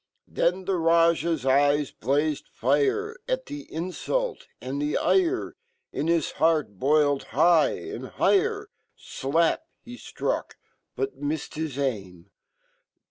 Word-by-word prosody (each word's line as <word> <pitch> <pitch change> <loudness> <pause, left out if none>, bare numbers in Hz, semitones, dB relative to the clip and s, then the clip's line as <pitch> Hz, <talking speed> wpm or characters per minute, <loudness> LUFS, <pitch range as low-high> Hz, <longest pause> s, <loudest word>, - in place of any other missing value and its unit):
Then 180 +2 0
fhe 185 -3 -1
Rajah's 165 -3 +3
eyes 145 +1 +3
blazed 145 +5 -1
fire 145 - 0
Atfhe - - -4
infult, 405 - -3
and 135 +3 -4
fheire 350 - +1 0.4
Inhis 165 +1 0
heart 155 - +2
boiled 145 0 +2
high 165 0 +5
and 400 +1 -7
higher. 415 +1 +1 0.3
51ap! 160 +5 0 0.2
he.flruck, 245 0 -4 0.4
but 410 0 -3
miffed 145 +1 -3
his 155 -3 -4
aim. 100 -9 -4
160 Hz, 100 wpm, -26 LUFS, -, 0.4 s, high